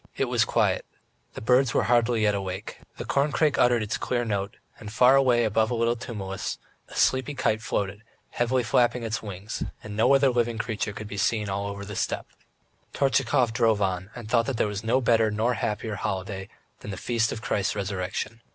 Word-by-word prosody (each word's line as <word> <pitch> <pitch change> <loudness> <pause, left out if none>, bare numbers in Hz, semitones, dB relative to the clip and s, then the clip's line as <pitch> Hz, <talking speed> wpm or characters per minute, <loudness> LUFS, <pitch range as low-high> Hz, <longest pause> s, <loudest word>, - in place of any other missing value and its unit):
It - - +2
was - - +2
quiet.... - - +1 0.5
The - - -6
birds 125 0 +3
were - - +3
hardly 120 -2 +2
yet 105 -1 +3
awake.... 95 0 -5 0.2
The - - -5
corncrake 145 +1 +1
uttered 120 -2 +4
its 105 - -3
clear 120 -1 -1
note, 100 -2 -2 0.2
and 105 -1 -8
far 125 +4 +6
away 125 -3 +4
above 110 0 +2
a 120 - -1
little 115 +1 +1
tumulus, 100 -5 -5 0.3
a - - -13
sleepy 130 +2 +2
kite 110 -4 0
floated, 100 -3 -2 0.3
heavily 125 +1 +1
flapping 120 +2 +2
its 115 0 -2
wings, 100 0 -6 0.2
and 105 -1 -7
no 115 +6 +5
other 135 0 +4
living 120 -1 0
creature 110 -2 -2
could 105 +1 -7
be 100 - -7
seen 105 +1 0
all 100 +1 -2
over 100 0 -6
the 105 0 -7
steppe. - - -2 0.6
Tortchakov 125 -3 +2
drove 115 -3 +3
on 95 -1 -1
and 120 -3 -8
thought 115 +1 +2
that 135 -4 -2
there - - +2
was 105 0 -4
no 120 +4 +2
better 115 -2 +3
nor 110 +4 +1
happier 110 0 -2
holiday 95 +1 -4 0.3
than - - -9
the 95 - -5
Feast 115 +2 0
of 110 - -6
Christ's 100 -6 0
Resurrection. 100 +3 -3
110 Hz, 195 wpm, -26 LUFS, 100-120 Hz, 0.6 s, far